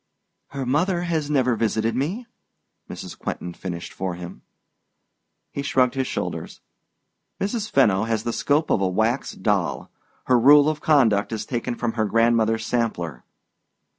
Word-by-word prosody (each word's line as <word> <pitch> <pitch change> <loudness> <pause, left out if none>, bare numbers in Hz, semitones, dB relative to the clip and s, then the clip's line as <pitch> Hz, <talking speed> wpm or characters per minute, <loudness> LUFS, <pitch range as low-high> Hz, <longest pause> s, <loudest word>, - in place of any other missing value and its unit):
"Her 140 -1 -5
mother 170 +8 +1
has 160 -4 -1
never 130 -5 +2
visited 110 0 0
me," 175 - -2 0.6
Mrs. - - -8
Quentin 90 - -5
finished 85 -1 -6
for 95 -2 -3
him. 90 0 -9 1.1
He - - -4
shrugged 130 -3 +2
his 135 -1 -1
shoulders. - - -4 0.8
"Mrs. 210 +1 -2
Fenno 105 - +3
has 110 -1 -1
the 120 - -2
scope 150 +2 +1
of 100 - +2
a 95 - +2
wax 110 +7 0
doll. 100 -2 -1 0.3
Her 125 -1 +4
rule 145 +4 +7
of 155 -1 -3
conduct 115 -10 +3
is 110 -1 -3
taken 120 0 -3
from 120 -1 -2
her 110 -1 0
grandmother's 115 0 +2
sampler." 90 - -2
120 Hz, 145 wpm, -23 LUFS, 110-145 Hz, 1.1 s, rule